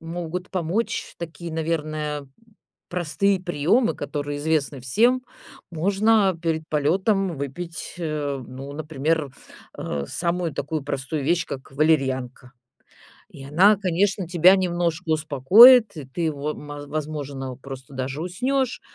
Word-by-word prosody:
могут 175 Hz, +2 st, -5 dB
помочь 185 Hz, +5 st, -2 dB
такие, 170 Hz, 0 st, -7 dB
наверное, 155 Hz, -3 st, -3 dB, 0.6 s
простые 180 Hz, +3 st, 0 dB
приемы, 180 Hz, -, +1 dB
которые 145 Hz, -1 st, -4 dB
известны 145 Hz, -2 st, -1 dB
всем. 235 Hz, -, +2 dB, 0.5 s
Можно 195 Hz, +2 st, +2 dB
перед 160 Hz, -1 st, -2 dB
полетом 185 Hz, +5 st, +1 dB
выпить, 165 Hz, +5 st, -6 dB
э, 150 Hz, -5 st, -3 dB
ну, 135 Hz, +2 st, -8 dB
например, 155 Hz, -1 st, -2 dB, 0.5 s
э, 70 Hz, -1 st, -3 dB
самую 170 Hz, -, -2 dB
такую 150 Hz, +2 st, -3 dB
простую 140 Hz, +1 st, -3 dB
вещь, 170 Hz, +3 st, +1 dB
как 135 Hz, 0 st, -8 dB
валерьянка. 130 Hz, -4 st, 0 dB, 0.8 s
И 135 Hz, -, -12 dB
она, 185 Hz, +9 st, +5 dB
конечно, 190 Hz, 0 st, 0 dB
тебя 175 Hz, +2 st, +6 dB
немножко 175 Hz, -2 st, -1 dB
успокоит, 190 Hz, -, +7 dB
и 145 Hz, -, -7 dB
ты 160 Hz, +4 st, -2 dB
во 150 Hz, +1 st, -4 dB
ма 145 Hz, 0 st, -9 dB
возможно, 145 Hz, -4 st, -5 dB
просто 135 Hz, 0 st, -9 dB
даже 130 Hz, +3 st, -4 dB
уснешь. 255 Hz, +9 st, -1 dB
160 Hz, 115 wpm, -23 LUFS, 145-180 Hz, 0.8 s, успокоит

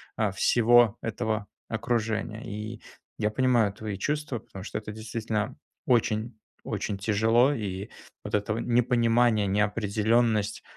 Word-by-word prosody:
а, 105 Hz, -3 st, +1 dB
всего 120 Hz, +2 st, +4 dB
этого 110 Hz, -1 st, -2 dB, 0.2 s
окружения. 110 Hz, -1 st, -1 dB
И 105 Hz, +2 st, -6 dB, 0.4 s
я 105 Hz, -, +1 dB
понимаю 120 Hz, -4 st, +2 dB
твои 105 Hz, -2 st, -5 dB
чувства, 145 Hz, -1 st, -2 dB
потому 95 Hz, -2 st, -11 dB
что -, -, -5 dB
это 105 Hz, -1 st, -6 dB
действительно 110 Hz, -1 st, -3 dB, 0.3 s
очень, 115 Hz, -1 st, +1 dB, 0.3 s
очень 100 Hz, -, -3 dB
тяжело, 115 Hz, +6 st, +3 dB
и 100 Hz, -4 st, -4 dB, 0.3 s
вот -, -, -7 dB
это 105 Hz, +1 st, 0 dB
вот 115 Hz, -, -2 dB
непонимание, 120 Hz, -2 st, +3 dB
неопределенность, 105 Hz, +1 st, +1 dB
110 Hz, 125 wpm, -27 LUFS, 105-120 Hz, 0.4 s, всего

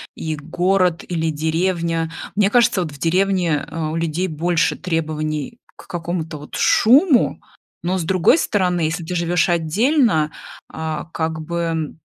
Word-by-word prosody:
и 155 Hz, -1 st, -3 dB
город, 175 Hz, +3 st, 0 dB
или 165 Hz, -2 st, -1 dB
деревня. 165 Hz, +1 st, -1 dB, 0.2 s
Мне 200 Hz, -1 st, +3 dB
кажется, 230 Hz, -5 st, +3 dB
вот, 155 Hz, -, -3 dB
в 145 Hz, -, -13 dB
деревне, 175 Hz, -3 st, +1 dB
э, 165 Hz, -, -8 dB
у 155 Hz, 0 st, -2 dB
людей 165 Hz, +2 st, -1 dB
больше 170 Hz, +1 st, 0 dB
требований 155 Hz, -, -3 dB, 0.2 s
к -, -, -14 dB
какому-то 170 Hz, -2 st, -4 dB
вот 145 Hz, +1 st, -10 dB
шуму, 270 Hz, -, +4 dB, 0.4 s
но, 180 Hz, +2 st, -1 dB
с 180 Hz, -, -2 dB
другой 185 Hz, -, +3 dB
стороны, 180 Hz, -, 0 dB
если 160 Hz, +1 st, -1 dB
ты 180 Hz, -, -4 dB
живешь 170 Hz, 0 st, +1 dB
отдельно, 175 Hz, -, +2 dB, 0.4 s
а, 160 Hz, -1 st, -4 dB
как 160 Hz, -1 st, -2 dB
бы. 165 Hz, -1 st, -2 dB
170 Hz, 145 wpm, -20 LUFS, 160-185 Hz, 0.4 s, шуму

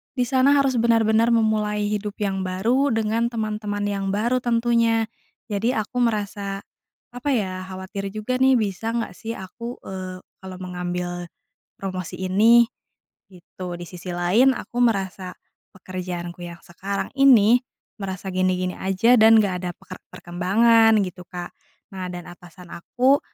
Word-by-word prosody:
di 250 Hz, -, +1 dB
sana 265 Hz, +3 st, +3 dB
harus 270 Hz, -4 st, +2 dB
benar-benar 225 Hz, -1 st, +3 dB
memulai 210 Hz, -2 st, +1 dB
hidup 210 Hz, 0 st, -3 dB
yang 195 Hz, -1 st, -1 dB
baru, 230 Hz, +10 st, +1 dB
dengan 225 Hz, +1 st, +1 dB
teman-teman 210 Hz, -3 st, -3 dB
yang 200 Hz, -1 st, -2 dB
baru 240 Hz, +5 st, +1 dB
tentunya. 230 Hz, -1 st, +2 dB, 0.5 s
Jadi 225 Hz, +5 st, 0 dB
aku 220 Hz, +3 st, -2 dB
merasa, 200 Hz, -3 st, -2 dB, 0.5 s
apa 245 Hz, +4 st, -4 dB
ya, 185 Hz, -4 st, -2 dB
khawatir 190 Hz, +1 st, -6 dB
juga 215 Hz, +5 st, -3 dB
nih, 260 Hz, 0 st, +5 dB
bisa 220 Hz, +2 st, -2 dB
ngga 230 Hz, -, -2 dB
sih 230 Hz, 0 st, -6 dB
aku, 230 Hz, +6 st, -8 dB
eee, 185 Hz, -1 st, -6 dB, 0.2 s
kalau 185 Hz, -1 st, -8 dB
mengambil 180 Hz, -1 st, -4 dB, 0.5 s
promosi 185 Hz, -2 st, -5 dB
ini, 215 Hz, +6 st, +5 dB, 0.7 s
gitu. 180 Hz, 0 st, -8 dB
Di -, -, -6 dB
sisi 180 Hz, 0 st, -9 dB
lain, 210 Hz, +10 st, +4 dB
aku 245 Hz, -, -6 dB
merasa 190 Hz, -4 st, -1 dB, 0.4 s
pekerjaanku 180 Hz, -2 st, -6 dB
yang 170 Hz, 0 st, -10 dB
sekarang 195 Hz, +3 st, -4 dB
ini, 245 Hz, -4 st, +6 dB, 0.4 s
merasa 190 Hz, 0 st, -5 dB
gini-gini 185 Hz, 0 st, 0 dB
aja, 195 Hz, +6 st, +3 dB
dan 225 Hz, +1 st, +7 dB
nggak 190 Hz, -3 st, -1 dB
ada -, -, -1 dB
perker -, -, -11 dB
perkembangan, 225 Hz, +6 st, +3 dB
gitu, 180 Hz, -1 st, -7 dB
Kak. 175 Hz, -1 st, -7 dB, 0.4 s
Nah, 185 Hz, -1 st, -5 dB
dan 175 Hz, -1 st, -8 dB
atasan 175 Hz, 0 st, -14 dB
aku 260 Hz, +10 st, +2 dB
205 Hz, 140 wpm, -23 LUFS, 185-230 Hz, 0.7 s, dan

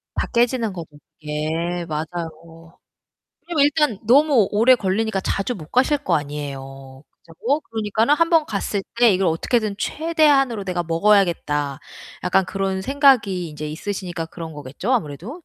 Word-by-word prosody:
다 -, -, -1 dB
깨지는 235 Hz, -3 st, +1 dB
거죠. 170 Hz, -3 st, -7 dB, 0.4 s
예. 165 Hz, +3 st, -2 dB
맞아요. 160 Hz, +2 st, -4 dB, 1.2 s
그럼 330 Hz, -4 st, -1 dB
일단 290 Hz, -6 st, +2 dB
너무 265 Hz, -4 st, +5 dB
오래 230 Hz, +5 st, +5 dB
걸리니까 205 Hz, -1 st, -1 dB
자주 195 Hz, +6 st, -2 dB
못 155 Hz, -4 st, -11 dB
가실 270 Hz, +4 st, +2 dB
거 280 Hz, -, -1 dB
아니에요. 135 Hz, -2 st, -7 dB, 0.2 s
그죠. 235 Hz, -, -2 dB
그러니까는 220 Hz, +4 st, +1 dB
'1 330 Hz, +2 st, +1 dB
번 325 Hz, -2 st, +4 dB
갔을 200 Hz, -1 st, -2 dB, 0.2 s
때 235 Hz, -4 st, +6 dB
이걸 185 Hz, 0 st, +1 dB
어떻게든 210 Hz, +5 st, 0 dB
최대한으로 290 Hz, -9 st, +2 dB
내가 180 Hz, -2 st, -2 dB
먹어야겠다.' 165 Hz, -6 st, +1 dB, 0.5 s
약간 190 Hz, +1 st, +3 dB
그런 190 Hz, 0 st, -2 dB
생각이 230 Hz, -, +3 dB
인제 150 Hz, 0 st, -6 dB
있으시니까 175 Hz, 0 st, -5 dB
그런 165 Hz, -1 st, -8 dB
거겠죠, 145 Hz, -, -4 dB
아무래도? 170 Hz, -, -2 dB
195 Hz, 325 characters per minute, -21 LUFS, 165-245 Hz, 1.2 s, 때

